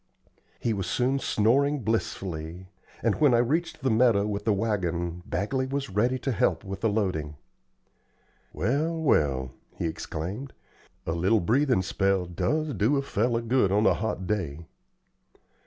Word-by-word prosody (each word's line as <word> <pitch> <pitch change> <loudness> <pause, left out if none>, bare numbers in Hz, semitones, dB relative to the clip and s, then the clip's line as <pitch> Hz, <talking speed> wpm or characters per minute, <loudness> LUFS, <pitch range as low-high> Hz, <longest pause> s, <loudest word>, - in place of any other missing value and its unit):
He 115 - 0
was 95 -4 -3
soon 130 +6 +1
snoring 135 +5 +2
blissfully, 95 -5 -3 0.3
and 115 +4 +1
when 140 -5 +6
I - - +5
reached 155 +8 0
the 130 - +2
meadow 110 -3 +4
with 105 -1 -3
the 110 - +3
wagon, 90 -5 -1
Bagley 130 +7 -1
was 135 -2 -3
ready 120 +6 +1
to 135 +2 -2
help 90 -7 +1
with 95 0 -6
the 115 - +2
loading. 90 -8 -1 1.2
"Well, 150 - 0
well!" 70 - +1 0.2
he - - -3
exclaimed, 90 - -5 0.5
"a - - -1
little 95 +7 +2
breathin' 125 +2 +2
spell 95 -1 +1
does 95 - -1
do 115 +7 +2
a 140 - 0
feller 115 -2 0
good 115 -4 +2
on 105 +2 +3
a - - +5
hot 105 -3 -3
day." 85 -7 -3
105 Hz, 150 wpm, -27 LUFS, 90-130 Hz, 1.2 s, when